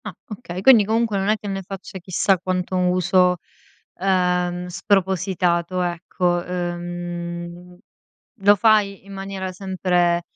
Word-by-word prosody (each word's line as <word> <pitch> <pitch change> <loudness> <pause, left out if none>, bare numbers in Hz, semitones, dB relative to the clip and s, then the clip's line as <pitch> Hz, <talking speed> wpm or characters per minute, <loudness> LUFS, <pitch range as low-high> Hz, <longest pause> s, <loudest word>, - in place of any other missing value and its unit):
Ah, - - -6
okay. 190 -5 -6
Quindi 230 -1 +7
comunque 220 -1 +1
non 195 - -1
è 215 - +3
che 210 - -9
ne 195 -1 -3
faccia 190 0 -8
chissà 185 +1 +1
quanto 185 0 -2
uso, 180 0 +3 0.6
ehm, 180 -1 +1
spropositato, 180 -1 0
ecco. 175 0 -1
Ehm, 175 0 -5 0.7
lo 205 +1 +6
fai 205 -2 +2
in 200 - -11
maniera 195 -1 -5
sempre, 180 -2 0
185 Hz, 120 wpm, -22 LUFS, 175-195 Hz, 0.7 s, Quindi